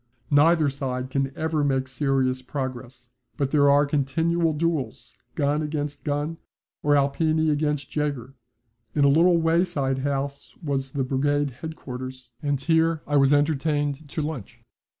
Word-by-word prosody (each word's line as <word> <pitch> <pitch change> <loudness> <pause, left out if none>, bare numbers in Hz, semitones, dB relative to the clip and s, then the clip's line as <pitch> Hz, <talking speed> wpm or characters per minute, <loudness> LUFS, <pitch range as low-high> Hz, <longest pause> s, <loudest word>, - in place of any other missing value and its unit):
Neither 155 +2 +5
side 130 -2 -4
can 135 0 0
ever 160 -1 0
make 135 -2 +1
serious 130 -1 0
progress, 130 -2 -6 0.3
but 140 -3 -1
there 145 -2 +4
are 145 +1 +5
continual 160 +4 +1
duels, 140 -7 -2 0.2
gun 145 +1 +1
against 150 -1 -4
gun, 150 +2 -2 0.4
or 145 0 +3
Alpini 155 +3 +2
against 150 -2 -1
Jaeger. 140 -4 -2 0.6
In 145 - +4
a - - +6
little 170 +4 +5
wayside 165 -5 +1
house 140 0 -3
was 135 -3 -2
the 140 - 0
brigade 145 +2 0
headquarters, 130 -3 -8
and 145 -2 0
here 160 +2 +2
I 145 - -1
was 135 0 +4
entertained 145 0 +1
to 155 - -3
lunch. 150 -9 -6
145 Hz, 140 wpm, -25 LUFS, 135-155 Hz, 0.6 s, a